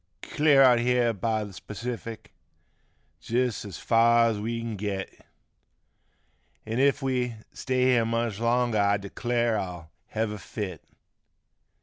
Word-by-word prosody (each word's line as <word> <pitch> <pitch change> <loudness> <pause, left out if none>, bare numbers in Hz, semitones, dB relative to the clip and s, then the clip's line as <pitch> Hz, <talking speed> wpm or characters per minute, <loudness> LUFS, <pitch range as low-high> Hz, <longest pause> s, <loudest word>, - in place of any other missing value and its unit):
53 - - -10
Clear 145 -2 +6
out 125 -2 +6
here 120 -1 +2
by 110 +1 -1
th' 100 -2 -12
Pacific, 115 +1 -6 0.9
jist 125 0 -1
as 100 - -7
fur 115 0 +4
as 105 - -4
we 115 +3 -3
kin 115 -1 -4
git 100 -1 -5 1.4
An' 110 +3 -2
if 140 +1 +2
we 125 -3 -1 0.2
stay 130 -1 -1
here 125 -3 +3
much 115 -2 -1
longer 120 -1 +1
I 100 0 +3
declare 115 +3 -1
I'll 90 -4 -7 0.2
hev 110 -1 -2
a 105 - -6
fit. 95 -2 -6
115 Hz, 135 wpm, -27 LUFS, 105-125 Hz, 1.4 s, Clear